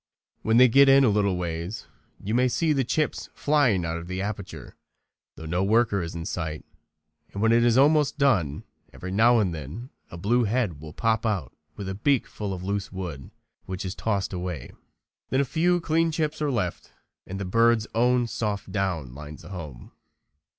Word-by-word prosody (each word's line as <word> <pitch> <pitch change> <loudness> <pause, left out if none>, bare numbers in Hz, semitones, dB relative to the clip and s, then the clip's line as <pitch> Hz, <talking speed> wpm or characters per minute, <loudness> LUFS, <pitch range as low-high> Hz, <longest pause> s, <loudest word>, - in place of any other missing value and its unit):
When 110 +1 +2
they 125 +1 +8
get 135 +3 +6
in 135 0 +7
a 125 - +5
little 100 -3 +1
ways 85 +5 -4 0.3
you 105 - -4
may 125 +2 +3
see 155 +5 +1
the 135 -2 +1
chips 155 +5 -1
flying 125 - +2
out 80 0 -2
of 85 +1 -8
the 95 +1 -4
aperture, 100 -1 -6 0.6
though 80 - -10
no 90 +4 0
worker 110 -1 +2
is 85 0 -5
in 85 -1 -5
sight, 80 -4 -4 0.7
and 100 - -6
when 115 +2 +3
it 120 0 +4
is 120 0 +4
almost 150 +2 +4
done 100 - +1 0.3
every 95 - -7
now 115 +5 +5
and 100 -6 +1
then 80 - -7 0.2
a 85 - -9
blue 115 +7 +2
head 105 - -1
will 80 -1 -9
pop 110 +5 0
out 100 - -2 0.2
with 100 - -6
a 95 - -3
beak 130 +6 +1
full 105 -2 -5
of 90 -1 -5
loose 100 +1 -3
wood, 85 -8 -6 0.4
which 95 +1 -5
is 95 - -3
tossed 100 -3 -2
away. 90 -7 -5 0.6
Then 130 - +1
a 140 - +2
few 170 +6 +2
clean 165 0 +1
chips 155 -1 -2
are 150 - +1
left 105 -10 -3 0.4
and 95 +1 -5
the 100 - -3
bird's 115 +3 +3
own 125 +1 +3
soft 105 -4 -3
down 90 -10 -2
lines 75 +2 -10
the 85 - -11
home. 75 -10 -8
105 Hz, 190 wpm, -26 LUFS, 90-125 Hz, 0.7 s, they